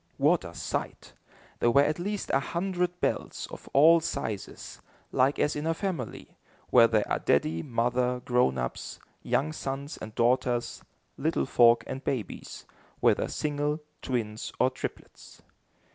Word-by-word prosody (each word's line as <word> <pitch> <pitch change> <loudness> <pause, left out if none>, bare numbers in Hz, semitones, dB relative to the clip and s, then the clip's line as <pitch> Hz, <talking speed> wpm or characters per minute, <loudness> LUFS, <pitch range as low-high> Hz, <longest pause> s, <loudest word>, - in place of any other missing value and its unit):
What - - +3
a - - -9
sight! - - -4 0.5
There 120 - +3
were 140 +4 +5
at 155 +3 0
least 205 +3 -3
a 135 - +5
hundred 180 +3 -2
bells, - - -2
of - - -10
all 160 +4 +7
sizes, 110 -10 -5 0.3
like 135 +3 +2
as 150 - +1
in 150 +2 -3
a 165 - +1
family; 170 - -5 0.3
where 115 -2 +8
there 110 -2 +1
are - - 0
daddy, 80 +3 +1
mother, 125 +3 0
grown 120 - +2
ups, 60 0 -4 0.2
young 155 +3 0
sons 140 0 -5
and 110 0 -9
daughters, 120 0 +1 0.4
little 160 +4 0
folk 120 -2 +5
and 135 - -6
babies, 120 -8 -4 0.3
whether - - +3
single, 150 0 -1 0.2
twins 110 -4 -3
or 130 +1 +4
triplets. 130 - -8
130 Hz, 145 wpm, -28 LUFS, 120-155 Hz, 0.5 s, where